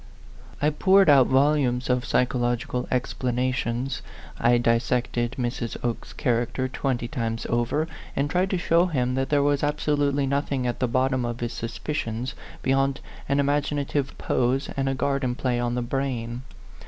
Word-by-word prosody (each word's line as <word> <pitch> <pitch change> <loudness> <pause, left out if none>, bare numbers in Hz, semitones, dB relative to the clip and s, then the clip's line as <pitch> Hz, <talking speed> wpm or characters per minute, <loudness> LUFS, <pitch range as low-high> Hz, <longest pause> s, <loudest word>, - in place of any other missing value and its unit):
I 150 +1 +2
poured 190 +2 +5
out 135 -3 +6
volumes 135 -2 +2
of 125 -1 +1
psychological 120 0 0
ex 125 -1 -1
planations. 125 0 -1 0.4
I 120 +1 +4
dissected 120 0 0
Mrs. 120 -2 -3
Oke's 120 -1 -3
character 120 +2 0
twenty 130 -2 -2
times 115 -1 -3
over, 120 +7 +1 0.3
and 140 - +1
tried 180 +5 +1
to 190 - 0
show 170 +1 +3
him 125 -7 0
that 135 +1 -1
there 145 -1 +3
was 145 -1 +2
absolutely 145 -1 +1
nothing 140 -1 -1
at 120 -1 -2
the 125 - +1
bottom 130 +1 +1
of 120 0 -3
his 120 0 -3
suspicions 120 +1 -3 0.3
beyond 135 +1 +2 0.3
an 140 - +2
imagina 145 0 +1
tive 140 -2 -2
pose 130 +3 0
and 135 0 0
a 135 - 0
garden 135 -2 0
play 125 -2 0
on 120 0 -1
the 125 - -1
brain. 120 -2 -2
130 Hz, 155 wpm, -25 LUFS, 120-140 Hz, 0.4 s, out